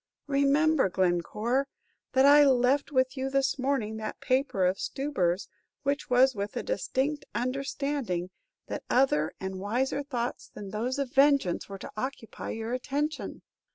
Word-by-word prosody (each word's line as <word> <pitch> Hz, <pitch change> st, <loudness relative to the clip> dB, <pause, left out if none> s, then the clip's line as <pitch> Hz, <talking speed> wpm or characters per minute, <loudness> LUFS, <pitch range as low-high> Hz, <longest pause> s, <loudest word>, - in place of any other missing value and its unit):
"Remember, 280 Hz, -2 st, +3 dB
Glencore, 200 Hz, +9 st, 0 dB, 0.5 s
when 265 Hz, +1 st, +5 dB
I 290 Hz, +1 st, +8 dB
left 270 Hz, +2 st, +3 dB
with 260 Hz, -1 st, +2 dB
you 265 Hz, 0 st, -2 dB
this 275 Hz, 0 st, +1 dB
morning 255 Hz, -5 st, -1 dB
that 215 Hz, -1 st, -5 dB
paper 255 Hz, -8 st, +1 dB
of 185 Hz, +2 st, +1 dB
Stubber's 195 Hz, -11 st, -1 dB, 0.4 s
it 285 Hz, +1 st, -1 dB
was 255 Hz, +1 st, +5 dB
with 205 Hz, -1 st, -4 dB
a -, -, -2 dB
distinct 295 Hz, -, -1 dB
understanding 255 Hz, -6 st, -2 dB, 0.3 s
that -, -, -5 dB
other 245 Hz, -, +2 dB
and 190 Hz, 0 st, -5 dB
wiser 250 Hz, +8 st, -1 dB
thoughts 250 Hz, -4 st, -4 dB
than 200 Hz, -2 st, -8 dB
those 240 Hz, +5 st, -2 dB
of 275 Hz, -3 st, -3 dB
vengeance 275 Hz, -12 st, +3 dB
were 195 Hz, -, -6 dB
to -, -, -9 dB
occupy 255 Hz, 0 st, -5 dB
your 225 Hz, +2 st, -4 dB
attention. 290 Hz, +4 st, -3 dB
260 Hz, 145 wpm, -28 LUFS, 215-280 Hz, 0.5 s, I